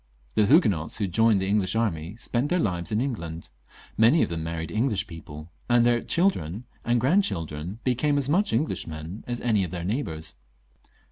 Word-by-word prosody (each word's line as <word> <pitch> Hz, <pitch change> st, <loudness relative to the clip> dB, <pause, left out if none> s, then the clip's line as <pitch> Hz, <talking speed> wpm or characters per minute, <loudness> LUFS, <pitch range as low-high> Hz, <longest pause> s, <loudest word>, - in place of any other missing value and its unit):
The 105 Hz, +9 st, +3 dB
Huguenots 105 Hz, -, +3 dB
who 105 Hz, -, -2 dB
had 95 Hz, -4 st, -3 dB
joined 110 Hz, -2 st, +4 dB
the 95 Hz, -, -1 dB
English 100 Hz, 0 st, +1 dB
army 95 Hz, -5 st, -1 dB
spent 120 Hz, +4 st, -1 dB
their 180 Hz, -, +2 dB
lives 90 Hz, -, -1 dB
in 105 Hz, -, +1 dB
England; 85 Hz, -11 st, -4 dB, 0.5 s
many 120 Hz, +9 st, +6 dB
of -, -, -1 dB
them 85 Hz, -1 st, -3 dB
married 80 Hz, 0 st, -4 dB
Eng 115 Hz, +6 st, +1 dB
lish 100 Hz, -5 st, 0 dB
people, 80 Hz, -1 st, -10 dB, 0.2 s
and 120 Hz, -1 st, +5 dB
their 120 Hz, -1 st, +3 dB
children 115 Hz, -, 0 dB, 0.2 s
and 120 Hz, 0 st, +2 dB
grandchildren 95 Hz, -, 0 dB
became 140 Hz, +4 st, +1 dB
as 140 Hz, -2 st, +1 dB
much 190 Hz, +8 st, +2 dB
Englishmen 85 Hz, -, -3 dB
as 120 Hz, -1 st, -3 dB
any 110 Hz, -5 st, +2 dB
of 90 Hz, -, -3 dB
their 85 Hz, 0 st, -5 dB
neighbours. 90 Hz, -, -3 dB
105 Hz, 185 wpm, -26 LUFS, 85-125 Hz, 0.5 s, many